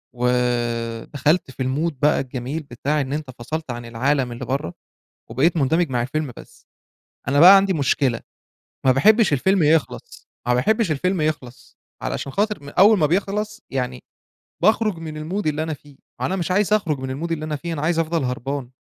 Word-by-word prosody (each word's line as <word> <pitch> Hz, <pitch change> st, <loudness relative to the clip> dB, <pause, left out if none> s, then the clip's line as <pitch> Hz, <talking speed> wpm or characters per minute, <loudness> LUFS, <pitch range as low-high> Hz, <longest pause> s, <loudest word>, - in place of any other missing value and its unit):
ودخلت 125 Hz, +4 st, 0 dB
في 130 Hz, -, -4 dB
الMood 150 Hz, +6 st, -1 dB
بقى 150 Hz, -, +3 dB
الجميل 130 Hz, +4 st, -4 dB
بتاع 145 Hz, +3 st, -2 dB
إن 135 Hz, 0 st, -4 dB
أنت 150 Hz, -3 st, -4 dB
فصلت 155 Hz, +3 st, -4 dB
عن 120 Hz, 0 st, -6 dB
العالم 125 Hz, +3 st, 0 dB
اللي 120 Hz, -, -6 dB
بَرّه 130 Hz, -10 st, -3 dB, 0.6 s
وبقيت 145 Hz, +9 st, +2 dB
مندمج 160 Hz, +2 st, +1 dB
مع 120 Hz, -2 st, 0 dB
الفيلم 145 Hz, +2 st, -3 dB
بس، -, -, -15 dB, 0.6 s
أنا 140 Hz, +1 st, +3 dB
بقى 185 Hz, +4 st, +10 dB
عندي 195 Hz, 0 st, +3 dB
مشكلة، 140 Hz, -5 st, +1 dB, 0.7 s
ما 130 Hz, -, +6 dB
باحبش 210 Hz, -, +4 dB
الفيلم 190 Hz, +6 st, +2 dB
يخلص، 155 Hz, 0 st, 0 dB, 0.2 s
ما 125 Hz, -, +3 dB
باحبش 215 Hz, -, +1 dB
الفيلم 180 Hz, +4 st, 0 dB
يخلص، 150 Hz, -5 st, -4 dB, 0.2 s
علشان 140 Hz, -, -4 dB
خاطر 205 Hz, -2 st, -1 dB
م 140 Hz, -, -8 dB
أول 205 Hz, +8 st, +5 dB
ما 160 Hz, -, +3 dB
بيخلص 210 Hz, +6 st, -1 dB
يعني 125 Hz, -1 st, -3 dB, 0.6 s
باخرج 215 Hz, 0 st, +2 dB
من 160 Hz, -1 st, -7 dB, 0.2 s
الMood 200 Hz, -2 st, -1 dB
اللي 155 Hz, +1 st, 0 dB
أنا 160 Hz, 0 st, -3 dB
فيه 145 Hz, 0 st, -14 dB, 0.3 s
وأنا 190 Hz, -, 0 dB
مش 180 Hz, -1 st, -2 dB
عايز 205 Hz, +2 st, +2 dB
أخرج 165 Hz, -9 st, +1 dB
من 130 Hz, +5 st, -4 dB
الMood -, -, -7 dB
اللي 155 Hz, -2 st, -2 dB
أنا 155 Hz, -1 st, -3 dB
فيه، 170 Hz, +3 st, -5 dB
أنا 150 Hz, -, -4 dB
عايز 165 Hz, +2 st, +1 dB
أفضل 165 Hz, -1 st, 0 dB
هربان. 125 Hz, +1 st, -3 dB
150 Hz, 180 wpm, -22 LUFS, 130-170 Hz, 0.7 s, بقى